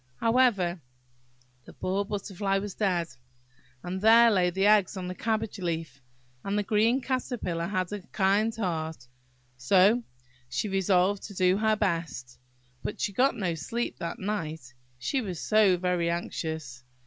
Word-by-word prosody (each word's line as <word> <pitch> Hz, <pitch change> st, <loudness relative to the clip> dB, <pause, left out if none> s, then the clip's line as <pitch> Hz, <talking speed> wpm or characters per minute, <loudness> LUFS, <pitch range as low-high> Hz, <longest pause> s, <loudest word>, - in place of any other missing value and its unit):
However, 225 Hz, -8 st, +2 dB, 0.8 s
the -, -, -13 dB
poor 195 Hz, +2 st, -1 dB
Butterfly 195 Hz, -1 st, -2 dB
was 200 Hz, 0 st, -4 dB
dead, 180 Hz, -5 st, 0 dB, 0.7 s
and 185 Hz, +1 st, -4 dB
there 230 Hz, +2 st, +7 dB
lay 180 Hz, -3 st, +3 dB
the 190 Hz, +3 st, 0 dB
eggs 205 Hz, -2 st, +4 dB
on 180 Hz, -1 st, -4 dB
the 180 Hz, -, -4 dB
cabbage 220 Hz, 0 st, -2 dB
leaf; 165 Hz, -6 st, -4 dB, 0.4 s
and 200 Hz, +1 st, -1 dB
the 210 Hz, -, +1 dB
green 225 Hz, +6 st, +2 dB
Caterpillar 245 Hz, -10 st, -2 dB
had 185 Hz, -1 st, -2 dB
a 205 Hz, -, -4 dB
kind 205 Hz, +3 st, +1 dB
heart, 160 Hz, -, -3 dB, 0.5 s
so 200 Hz, -, +4 dB, 0.5 s
she 130 Hz, +11 st, -2 dB
resolved 195 Hz, 0 st, +2 dB
to 200 Hz, -, -11 dB
do 185 Hz, 0 st, +3 dB
her 220 Hz, 0 st, +2 dB
best. 165 Hz, -, -3 dB, 0.4 s
But -, -, -5 dB
she 205 Hz, -, -1 dB
got 265 Hz, +7 st, +3 dB
no 185 Hz, -5 st, -1 dB
sleep 230 Hz, +10 st, -4 dB
that 170 Hz, 0 st, -4 dB
night, 160 Hz, -10 st, -4 dB, 0.2 s
she 260 Hz, -, -1 dB
was 185 Hz, -7 st, -5 dB
so 215 Hz, -4 st, +4 dB
very 180 Hz, -1 st, 0 dB
anxious. 160 Hz, -6 st, -4 dB
190 Hz, 150 wpm, -28 LUFS, 170-215 Hz, 0.8 s, there